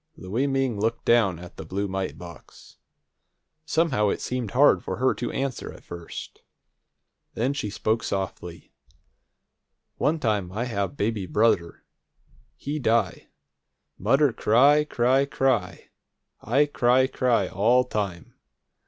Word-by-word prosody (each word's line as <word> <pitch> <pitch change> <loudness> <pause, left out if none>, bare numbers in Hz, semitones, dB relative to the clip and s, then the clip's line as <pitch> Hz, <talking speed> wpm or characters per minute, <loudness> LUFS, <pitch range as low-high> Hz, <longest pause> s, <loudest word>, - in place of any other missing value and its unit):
Louie 115 +9 -2
Ming 135 -5 0
looked 115 +2 -1
down 110 -7 +3
at 90 +1 -12
the - - -6
blue 100 +5 -3
mite 95 0 -4
box. 85 -1 -13 0.9
Somehow 145 -11 +1
it - - -1
seemed 125 -4 -3
hard 135 +7 +4
for - - -4
her 130 +1 +2
to 120 - -4
answer, 135 -1 -3
at - - -14
first. 85 -1 -9 0.9
Then 125 +5 0
she 125 -7 -3
spoke 110 +2 -1
softly: 90 -4 -5 1.3
"One 155 +3 +1
time 105 -8 -1
I 110 +4 -2
have 115 +2 -3
baby 105 -3 -1
brudder. 105 -6 +1 0.7
He 150 +2 -4
die. 115 -3 0 0.7
Mudder 135 +6 +3
cry, 140 +9 +4
cry, 130 0 +2
cry. 130 -9 -1 0.5
I 135 +7 +2
cry, 130 -2 +3
cry 125 -7 +1
all 115 +8 +3
time. 100 -8 -4
115 Hz, 125 wpm, -25 LUFS, 100-130 Hz, 1.3 s, hard